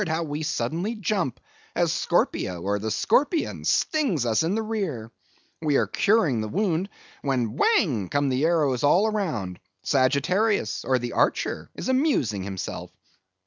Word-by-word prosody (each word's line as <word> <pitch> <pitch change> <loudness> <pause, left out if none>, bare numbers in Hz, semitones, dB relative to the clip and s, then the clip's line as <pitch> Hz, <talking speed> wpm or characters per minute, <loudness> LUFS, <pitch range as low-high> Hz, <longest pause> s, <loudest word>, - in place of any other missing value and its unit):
how 160 +1 -1
we 150 -1 -4
suddenly 160 - -2
jump, 195 - -1 0.4
as - - +2
Scorpio, 90 -2 0
or 100 +3 -1
the 110 +2 -3
Scorpion, 295 - +1
stings 255 - +1
us 110 -2 +2
in 165 +5 0
the 225 - -1
rear; 180 - -3 0.5
we 150 -3 +1
are - - +3
curing 175 - +2
the 110 - -3
wound, 185 - 0 0.3
when 125 -5 -1
whang 140 - +2
come 145 -1 +1
the 130 +2 0
arrows 150 -7 +2
all 175 +9 +4
round; 120 - -3 0.2
Sagittarius, 140 - +1
or 130 - +2
the 120 -1 -4
Archer, - - 0
is - - -5
amusing 260 - +1
himself. 95 -1 -5
150 Hz, 145 wpm, -25 LUFS, -, 0.5 s, all